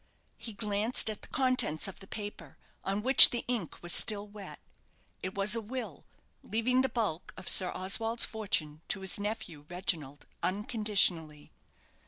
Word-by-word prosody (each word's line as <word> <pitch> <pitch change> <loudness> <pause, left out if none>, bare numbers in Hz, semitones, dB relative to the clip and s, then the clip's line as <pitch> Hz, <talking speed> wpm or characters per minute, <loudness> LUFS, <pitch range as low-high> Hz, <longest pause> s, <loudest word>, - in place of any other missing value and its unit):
He 225 - -9
glanced 210 +2 -1
at 210 - -10
the - - -13
contents 255 - -1
of 195 - -10
the 195 - -14
paper, 205 -9 -8 0.3
on 195 +2 -4
which 265 +2 +11
the 240 - -4
ink 230 -11 -4
was 175 - 0
still 210 -1 +3
wet. 205 -1 -12 0.6
It 185 - -7
was 200 +2 +1
a 230 - -3
will, 250 +4 -8 0.4
leaving 250 +3 -1
the 265 - -1
bulk 215 -9 -4
of - - -11
Sir 185 -2 +4
Oswald's 225 +5 +1
fortune 160 -9 -4
to 190 - -3
his 190 +1 0
nephew, 190 -8 -7
Reginald, 160 -6 -4 0.2
unconditionally. 195 -7 0
205 Hz, 155 wpm, -29 LUFS, 180-225 Hz, 0.6 s, which